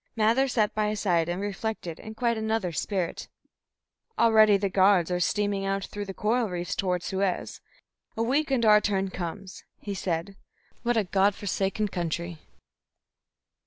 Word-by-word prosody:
Mather 230 +5 +3
sat 220 -5 +1
by 215 0 0
his 210 -1 -3
side 170 -4 +1
and 175 +1 -2
reflected 205 -4 -4
in 220 0 -9
quite 235 0 +1
another 220 -4 -1
spirit. 185 +1 -3 0.9
"Already 220 -3 +6
the 200 0 -1
Guards 190 -2 +3
are 180 - 0
steaming 205 +2 0
out 195 0 -1
through 205 0 -6
the 195 - -6
coral 225 +1 +1
reefs 175 -1 -3
toward 180 -2 -1
Suez. 190 -1 -2 0.6
A 225 - +1
week 280 +6 +1
and 255 -4 +1
our 210 -1 +7
turn 195 -2 0
comes," 185 +2 -6 0.2
he 205 - -5
said. 185 0 -3 0.5
"What 240 -1 +1
a 220 - +3
God 195 +2 +2
forsaken 200 +1 -1
country!" 170 -1 -3
200 Hz, 160 wpm, -27 LUFS, 185-220 Hz, 0.9 s, our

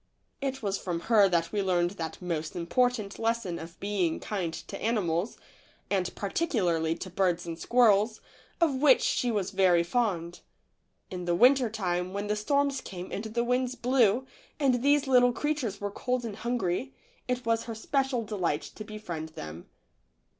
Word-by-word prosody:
4 - - -45
THE - - -46
LITTLE 270 -1 -7
FORESTERS. - - -22
It - - -3
was 195 0 0
from 175 -2 -2
her 205 -3 +7
that 170 -2 +1
we 210 - 0
learned 175 -2 +2
that 165 -4 -6
most 160 -3 -3
important 215 +4 0
lesson 225 -6 -1
of 165 +1 -10
being 195 -5 0
kind 185 -6 -3
to 195 +4 -8
animals, 200 -3 0 0.5
and 185 -2 0
particularly 180 - 0
to 185 - -7
birds 180 -2 +1
and 165 -1 -6
squirrels, 220 0 +3 0.4
of 330 -4 +3
which 265 0 +5
she 245 - +1
was 205 -5 -1
very 180 -3 +4
fond. 175 -4 -1 0.7
In 180 -1 -5
the 175 -1 +1
winter 250 +3 +5
time, 180 -4 -2
when 200 +1 -3
the 210 0 0
storms 280 +5 +1
came 180 -1 -8
and 200 - -4
the 230 +2 -1
winds 250 +1 0
blew, 245 -1 +3 0.3
and 260 -4 +2
these 285 +2 +3
little 250 -2 +5
creatures 260 -8 -2
were 205 0 -3
cold 250 +3 -2
and 215 -3 -5
hungry, 235 +1 -2 0.3
it 250 -1 -2
was 230 0 +1
her 230 - -5
special 265 +1 0
delight 185 -8 -1
to 215 - -7
befriend 180 -7 -6
them. 80 +2 -8
210 Hz, 175 wpm, -29 LUFS, 180-245 Hz, 0.7 s, her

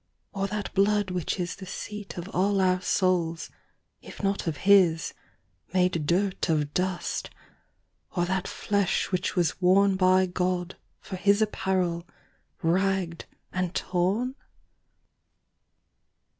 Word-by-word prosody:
or 195 -1 -1
that 210 0 -4
blood 205 0 +2
which 180 -3 -1
isThe 185 +1 -5
seat 205 +1 -7
of 175 +1 -5
all 195 +2 +1
our 185 -1 +2
Soules, 175 -4 0 0.5
if - - -11
not 195 -2 0
of 155 -3 -1
his, 185 -5 +5 0.6
Made 180 -4 +2
durt 185 +2 +1
of 150 -2 +1
dust, 185 0 -2 0.9
or 175 -1 +2
that 190 +1 -1
flesh 200 -2 0
which 185 0 -1
was 175 -3 +2
worneBy 185 -1 +4
God, 180 0 -1 0.3
for 190 - -6
his 200 +2 +3
apparell, 185 -5 0 0.6
rag'd, 185 0 0 0.3
and 185 0 -2
torne? 195 +8 0
185 Hz, 115 wpm, -27 LUFS, 175-195 Hz, 0.9 s, his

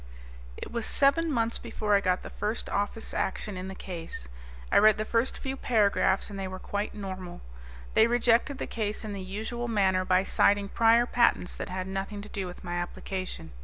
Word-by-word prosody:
It - - -7
was 235 -1 -2
seven 300 +4 +3
months 230 -3 +1
before 220 -3 -2
I 200 - +5
got 185 -1 +1
the - - -8
first 215 +2 -2
Office 205 +2 -2
Action 200 +1 -2
in 185 0 -5
the 190 - -6
Case. 165 - -6 0.4
I - - +6
read 215 0 +6
the 215 - -2
first 230 +3 0
few 265 -1 -4
paragraphs 205 -6 +2
and 200 - -6
they 190 - -3
were 185 0 -6
quite 205 +3 -3
normal. 185 -3 -6 0.5
They 220 - +6
rejected 240 +3 +3
the - - -3
Case 215 -1 -3
in 215 -1 -5
the 195 - -5
usual 220 +6 -4
manner 190 -4 +2
by 185 0 +3
citing 200 +1 +3
prior 230 +2 +5
patents 235 -7 +2
that - - -6
had 185 0 -3
nothing 195 +2 -4
to 210 - -10
do 195 -2 -4
with 180 - -10
my 175 -1 -3
application. 175 - -5
205 Hz, 200 wpm, -28 LUFS, 190-230 Hz, 0.5 s, I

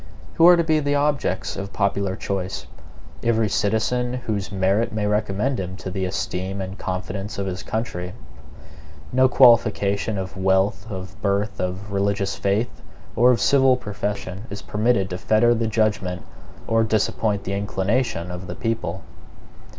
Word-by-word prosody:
Who 165 - +6
are 180 - +9
to 170 - +3
be 160 -1 +2
the 145 -1 0
objects 145 -9 0
of 100 0 -6
popular 100 -1 0
choice? 95 -1 -3 0.6
Every 115 -2 +2
citizen 110 +4 0
whose 110 -6 -3
merit 100 +4 +1
may 110 -1 -1
recommend 105 +5 0
him 95 0 -5
to 95 - -6
the 95 0 -2
esteem 95 +1 -3
and 95 0 -5
confidence 95 +2 -4
of 100 - -2
his 95 0 -4
country. 90 -5 -4 1.0
No 130 +1 +5
qualification 110 -5 +4
of 95 -1 -5
wealth, 95 +2 +1
of 95 0 -7
birth, 100 +1 0
of 95 +3 -3
religious 100 0 0
faith, 100 +4 -1 0.3
or 120 +3 +5
of 125 - +4
civil 135 -2 +4
profession 100 -3 -4
is 100 -1 -7
permitted 100 0 +1
to 90 - -4
fetter 110 +5 +4
the 115 -1 0
judgement 105 -5 0 0.4
or 115 0 +2
disappoint 110 -1 0
the 95 - -3
inclination 100 -2 -1
of 90 0 -7
the 90 - -6
people. 95 -4 -3
100 Hz, 150 wpm, -23 LUFS, 95-115 Hz, 1.0 s, are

